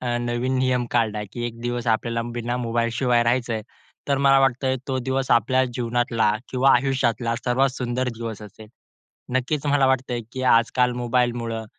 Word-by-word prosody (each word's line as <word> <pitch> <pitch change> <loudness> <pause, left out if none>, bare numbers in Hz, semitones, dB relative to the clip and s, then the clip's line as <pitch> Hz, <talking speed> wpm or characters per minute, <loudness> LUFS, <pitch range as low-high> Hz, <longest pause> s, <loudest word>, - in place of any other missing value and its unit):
अ, 120 -1 -1
नवीन 120 +2 -1
नियम 130 -1 +1
काढला, 110 -3 0
की 120 -1 -3
एक 115 0 -8
दिवस 120 0 -3
आपल्याला 115 +1 0 0.2
बिना 120 +1 -2
मोबाईलशिवाय 120 +1 +1
राहायचं 120 0 0
आहे, 110 - -3 0.5
तर 140 -1 +2
मला 135 0 +6
वाटतंय 130 0 +1
तो 130 -1 0
दिवस 135 0 -1
आपल्या 130 +3 +3
जीवनातला 120 -2 +1 0.2
किंवा 130 +1 +4
आयुष्यातला 125 -2 0
सर्वात 130 +2 +2
सुंदर 125 +1 -2
दिवस 115 -2 -6
असेल. 105 +1 -12 0.7
नक्कीच 140 +3 -1
मला 140 -1 +3
वाटतंय, 130 -2 0
की 130 - -4
आजकाल 125 +2 +2
मोबाईलमुळं 120 -2 -1
120 Hz, 160 wpm, -23 LUFS, 115-130 Hz, 0.7 s, मला